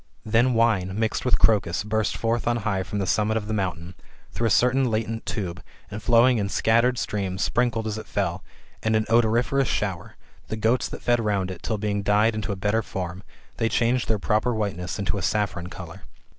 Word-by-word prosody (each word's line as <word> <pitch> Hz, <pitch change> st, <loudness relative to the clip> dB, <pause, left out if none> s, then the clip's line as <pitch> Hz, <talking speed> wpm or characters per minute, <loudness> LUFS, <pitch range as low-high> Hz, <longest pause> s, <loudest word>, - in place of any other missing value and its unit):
Then 120 Hz, +3 st, +3 dB
wine, 105 Hz, -5 st, +2 dB
mixed 110 Hz, +2 st, -1 dB
with 125 Hz, -, +3 dB
crocus, 100 Hz, -4 st, +2 dB
burst 110 Hz, 0 st, -1 dB
forth 115 Hz, +1 st, -1 dB
on 120 Hz, 0 st, +2 dB
high 100 Hz, -3 st, 0 dB
from 105 Hz, -, -5 dB
the 100 Hz, -, 0 dB
summit 110 Hz, +3 st, +1 dB
of 105 Hz, -, -3 dB
the 110 Hz, -, -2 dB
mountain, 90 Hz, -3 st, -3 dB, 0.4 s
through 115 Hz, -, 0 dB
a -, -, +1 dB
certain 125 Hz, +3 st, +3 dB
latent 110 Hz, 0 st, -2 dB
tube, 95 Hz, -3 st, -4 dB, 0.3 s
and 105 Hz, +1 st, -6 dB
flowing 120 Hz, +2 st, +4 dB
in 100 Hz, -1 st, -1 dB
scattered 115 Hz, +4 st, +2 dB
streams, 95 Hz, -5 st, -2 dB
sprinkled 120 Hz, -2 st, 0 dB
as 110 Hz, 0 st, -3 dB
it -, -, -10 dB
fell, -, -, -2 dB, 0.4 s
with 110 Hz, 0 st, +2 dB
an 110 Hz, 0 st, +2 dB
odoriferous 120 Hz, +4 st, +2 dB
shower, 95 Hz, -6 st, -3 dB, 0.3 s
the 110 Hz, -, -4 dB
goats 115 Hz, +3 st, +1 dB
that -, -, -8 dB
fed 120 Hz, 0 st, +3 dB
round 100 Hz, -4 st, 0 dB
it, 90 Hz, -, -9 dB
till 110 Hz, -, -2 dB
being 100 Hz, -1 st, -1 dB
dyed 105 Hz, +3 st, +3 dB
into 110 Hz, 0 st, -3 dB
a -, -, -2 dB
better 105 Hz, +4 st, 0 dB
form, 90 Hz, -3 st, -5 dB, 0.4 s
they 115 Hz, -1 st, +1 dB
changed 120 Hz, +2 st, +1 dB
their 110 Hz, -, +2 dB
proper 110 Hz, +4 st, 0 dB
whiteness 95 Hz, -4 st, -3 dB
into 100 Hz, 0 st, -1 dB
a -, -, -5 dB
saffron 95 Hz, -3 st, -1 dB
colour. 90 Hz, -3 st, -9 dB
110 Hz, 200 wpm, -24 LUFS, 100-115 Hz, 0.4 s, flowing